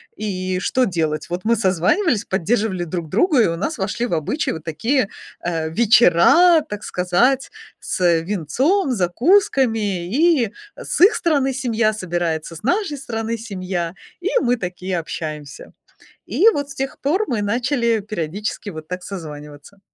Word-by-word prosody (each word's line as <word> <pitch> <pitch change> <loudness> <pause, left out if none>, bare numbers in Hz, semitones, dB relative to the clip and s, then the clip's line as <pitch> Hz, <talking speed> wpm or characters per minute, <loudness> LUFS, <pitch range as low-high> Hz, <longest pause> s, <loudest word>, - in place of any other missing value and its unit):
И 185 -3 -3
что 255 +6 +1
делать? 160 -4 -2
Вот 175 +1 -3
мы 230 +1 +3
созванивались, 205 - +1
поддерживали 190 -1 0
друг 170 -1 -5
друга, 260 - +3
и - - +3
у 165 0 -2
нас 280 - -3
вошли 210 +4 -2
в 235 - -3
обычай 165 - -1
вот 160 - -8
такие, 200 - 0 0.3
э, 165 -2 -2
вечера, 235 - +5
так 210 -9 -7
сказать, 245 - +1 0.3
с 175 -2 +1
винцом, 255 - 0
закусками. 225 - +2
И 265 - +2 0.2
с - - -3
их 385 +5 +8
стороны 280 -6 +1
семья 235 -4 +1
собирается, 170 -4 -3
с 160 - -10
нашей 350 - 0
стороны 230 -3 -3
семья, 185 -5 -4 0.3
и 380 - -1
мы 245 -1 +1
такие 180 -2 -3
общаемся. 155 -3 -7 0.5
И 440 - +4
вот 285 -4 -3
с 275 - -8
тех 270 0 -4
пор 355 +10 +1
мы 230 -6 -1
начали 235 +1 0
периодически 205 +1 -4
вот 155 -3 -9
так 180 0 -5
созваниваться. 150 0 -9
205 Hz, 145 wpm, -20 LUFS, 175-260 Hz, 0.5 s, их